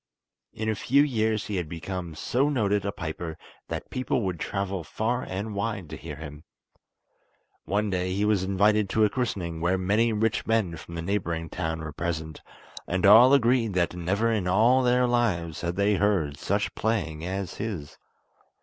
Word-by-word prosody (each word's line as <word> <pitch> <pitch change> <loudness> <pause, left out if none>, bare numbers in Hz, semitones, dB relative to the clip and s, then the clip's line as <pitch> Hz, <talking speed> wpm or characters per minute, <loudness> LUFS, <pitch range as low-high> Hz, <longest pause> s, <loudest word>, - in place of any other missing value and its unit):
In 110 - -4
a 110 - +2
few 140 +6 +3
years 110 -6 0
he 105 -3 -3
had 85 -4 -3
become 85 0 -5
so 130 - +1
noted 105 -7 +1
a - - 0
piper 80 -2 -5 0.3
that - - -6
people 130 -1 -1
would 90 -4 -2
travel 95 -1 -3
far 120 +9 -1
and 100 +4 -4
wide 100 -4 -3
to - - -4
hear 80 -3 -8
him. 75 0 -9 1.2
One 105 0 0
day 90 0 -1
he 100 +3 0
was 105 -3 +2
invited 100 +2 +2
to 110 +2 +3
a 105 - 0
christening 90 -10 -2
where 90 +2 +2
many 105 +5 +2
rich 110 +1 0
men 110 -7 +1
from 85 +1 -10
the 85 - -4
neighbouring 85 -4 -2
town 80 -2 -3
were 80 -2 -6
present, 80 -1 -4 0.5
and 95 +1 0
all 115 +6 +9
agreed 120 -6 +3
that 85 -1 +1
never 95 +6 0
in 105 -5 0
all 115 +8 +4
their 125 0 +3
lives 105 -10 0
had 85 0 -2
they 100 +2 +2
heard 95 -9 +1
such 100 +7 -1
playing 85 -9 -1
as 95 +1 -4
his. 95 -10 -5
100 Hz, 175 wpm, -26 LUFS, 85-110 Hz, 1.2 s, all